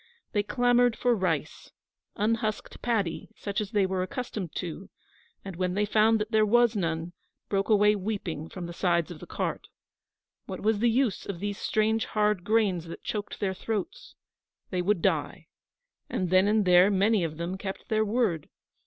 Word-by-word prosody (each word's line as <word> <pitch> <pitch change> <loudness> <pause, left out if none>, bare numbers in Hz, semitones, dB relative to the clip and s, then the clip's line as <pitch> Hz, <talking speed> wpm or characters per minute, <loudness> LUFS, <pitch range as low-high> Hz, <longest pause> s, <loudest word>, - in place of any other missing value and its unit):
They 205 - +2
clamoured 245 +2 +3
for 245 +1 +2
rice 175 -7 -2 0.5
unhusked 215 0 -1
paddy, 205 -9 -1
such 200 -1 -3
as 205 - -4
they 205 -4 +2
were 190 0 -1
accustomed 190 - -4
to 175 +2 -5 0.6
and, 195 -2 -6
when 180 +1 -1
they 210 +1 +2
found 220 +1 +3
that 210 +1 -3
there 220 -1 +4
was 240 +2 +4
none, 165 -2 -2 0.4
broke 195 +1 0
away 210 0 +5
weeping 185 -6 -4
from 180 -2 -6
the 170 - -7
sides 170 -2 +1
of 165 - -9
the - - -10
cart. - - -3 0.8
What - - -6
was 215 -1 +2
the 235 +2 +3
use 235 -3 0
of 195 -4 -5
these 205 +1 -3
strange 220 +1 +1
hard 210 -3 +1
grains 205 -6 +1
that 165 - -9
choked 205 -1 -4
their 195 -2 0
throats? 205 +1 -5 0.6
They 180 -2 0
would 185 -1 +1
die. - - -1 0.6
And 180 -2 -2
then 185 +2 +5
and 210 -1 +3
there 180 0 +7
were 200 -1 +2
many 205 0 +3
of 155 -2 -3
them 170 +2 -3
kept 195 -1 -6
their 220 -1 +2
word. 210 -8 0
205 Hz, 180 wpm, -28 LUFS, 180-220 Hz, 0.8 s, there